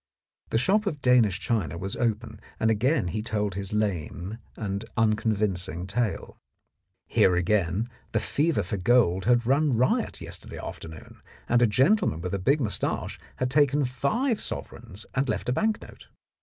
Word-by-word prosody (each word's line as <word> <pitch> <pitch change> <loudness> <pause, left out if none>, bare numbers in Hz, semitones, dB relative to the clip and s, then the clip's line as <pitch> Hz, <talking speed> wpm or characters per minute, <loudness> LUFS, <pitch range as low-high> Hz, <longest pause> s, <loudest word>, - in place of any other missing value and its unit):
The - - +1
shop 200 - +2
of 150 -7 -2
Danish 115 -7 +4
china 100 - -1
was 95 +3 -3
open, 110 -2 -2 0.2
and 110 0 +3
again 115 - +1
he 105 +4 -2
told 105 -2 -2
his 100 0 -5
lame 100 0 -2 0.2
and 100 -1 -3
unconvincing 105 -6 0
tale. 110 +2 -2 0.7
Here 90 - +3
again 95 +3 +1 0.2
the 110 - +1
fever 150 -2 0
for 100 +3 -3
gold 95 -3 +3
had 120 0 +3
run 135 0 +2
riot 125 +2 +1
yesterday - - -9
afternoon, 80 -1 -9 0.3
and 120 0 +3
a 120 - +6
gentleman 130 - +2
with 90 +2 -4
a 100 - 0
big 140 +11 +2
moustache 110 -7 -2 0.2
had 130 0 -2
taken 145 0 +3
five 210 - 0
sovereigns 100 +4 -7
and 135 -1 0
left 110 - -2
a - - +2
bank 215 +7 +1
note. - - -14
110 Hz, 155 wpm, -26 LUFS, 95-130 Hz, 0.7 s, a